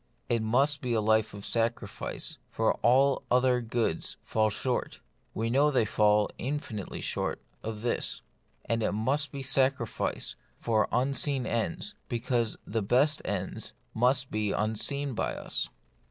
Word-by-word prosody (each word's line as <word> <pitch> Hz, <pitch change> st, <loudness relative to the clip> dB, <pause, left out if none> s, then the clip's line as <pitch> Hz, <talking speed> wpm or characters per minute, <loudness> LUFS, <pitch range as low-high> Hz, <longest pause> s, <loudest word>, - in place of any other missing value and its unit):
It 115 Hz, -1 st, +2 dB
must 135 Hz, +6 st, +2 dB
be 125 Hz, -2 st, -1 dB
a 115 Hz, -, +3 dB
life 110 Hz, 0 st, +3 dB
of 100 Hz, -, -8 dB
sacrifice, 115 Hz, -3 st, -2 dB
for -, -, +2 dB
all 135 Hz, +3 st, +4 dB
other 125 Hz, 0 st, +3 dB
goods 115 Hz, -7 st, -1 dB
fall 110 Hz, -1 st, +2 dB
short 125 Hz, +4 st, -2 dB, 0.2 s
— -, -, -41 dB
we 115 Hz, +1 st, -1 dB
know 140 Hz, +4 st, +4 dB
they 130 Hz, -6 st, +3 dB
fall 105 Hz, 0 st, +3 dB
infinitely 125 Hz, -6 st, -4 dB
short -, -, -2 dB
— -, -, -37 dB
of 105 Hz, -1 st, -8 dB
this; 120 Hz, -, -1 dB, 0.4 s
and 115 Hz, 0 st, 0 dB
it 105 Hz, -, +1 dB
must 135 Hz, +7 st, +1 dB
be 140 Hz, -1 st, -5 dB
sac 135 Hz, 0 st, +3 dB
rifice 105 Hz, -, -2 dB, 0.2 s
for 110 Hz, -2 st, +1 dB
unseen 135 Hz, +1 st, +1 dB
ends, 165 Hz, -, -2 dB, 0.2 s
because 120 Hz, -1 st, 0 dB
the 110 Hz, +1 st, -1 dB
best 130 Hz, +8 st, +3 dB
ends 95 Hz, -2 st, -4 dB, 0.2 s
must 130 Hz, +3 st, +2 dB
be 105 Hz, -1 st, 0 dB
unseen 130 Hz, +7 st, 0 dB
by -, -, -1 dB
us. -, -, -2 dB
120 Hz, 155 wpm, -29 LUFS, 110-135 Hz, 0.4 s, all